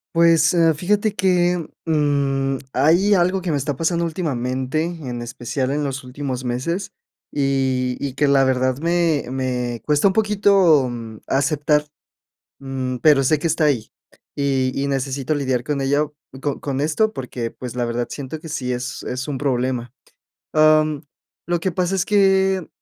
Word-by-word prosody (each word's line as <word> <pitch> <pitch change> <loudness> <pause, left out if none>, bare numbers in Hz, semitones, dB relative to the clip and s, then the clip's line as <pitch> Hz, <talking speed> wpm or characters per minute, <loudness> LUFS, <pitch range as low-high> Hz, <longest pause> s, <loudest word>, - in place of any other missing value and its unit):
Pues, 165 -1 +5
eh, 165 -2 +4
fíjate 205 +6 0
que, 180 -3 +1 0.2
mm, 140 -3 +1 0.2
hay 190 +7 +4
algo 185 +2 +2
que 180 - -3
me 150 - +1
está 140 +1 -2
pasando 170 +3 0
últimamente, 130 -3 -2
en 145 -9 -5
especial 120 +3 -3
en 145 +1 -1
los 135 -2 -3
últimos 130 0 -5
meses, 130 +10 -2 0.4
y 130 -3 0
y 140 -2 -3
que 145 +2 +1
la 140 -1 +4
verdad 130 -1 +1
me 165 -1 +1
me 125 -3 -2
cuesta 150 +4 +3
un 190 - +2
poquito 200 - +4 0.4
aceptar, 150 +2 +1 0.7
mm, 130 -2 -4
pero 145 +1 +4
sé 150 +3 +2
que 165 - 0
está 160 0 0
ahí. 130 -7 0 0.5
Y 135 -2 0
y 140 +1 -1
necesito 135 +1 -1
lidiar 130 -4 -1
con 145 +2 -2
ello, 145 +2 0 0.3
co 145 -1 -2
con 140 -1 -3
esto 215 +9 +1
porque, 125 -2 -4
pues, 125 0 -8
la 120 - 0
verdad, 120 0 -2
siento 145 +2 -6
que 160 - -9
sí 125 -4 -2
es 125 +1 -5
es 130 +3 -4
un 140 - -2
problema, 125 -3 -1 0.6
am, 155 -1 +4 0.4
lo 175 0 0
que 190 +2 -1
pasa 180 +1 -1
es 185 -2 +1
que 190 -3 +3
145 Hz, 160 wpm, -21 LUFS, 130-165 Hz, 0.7 s, Pues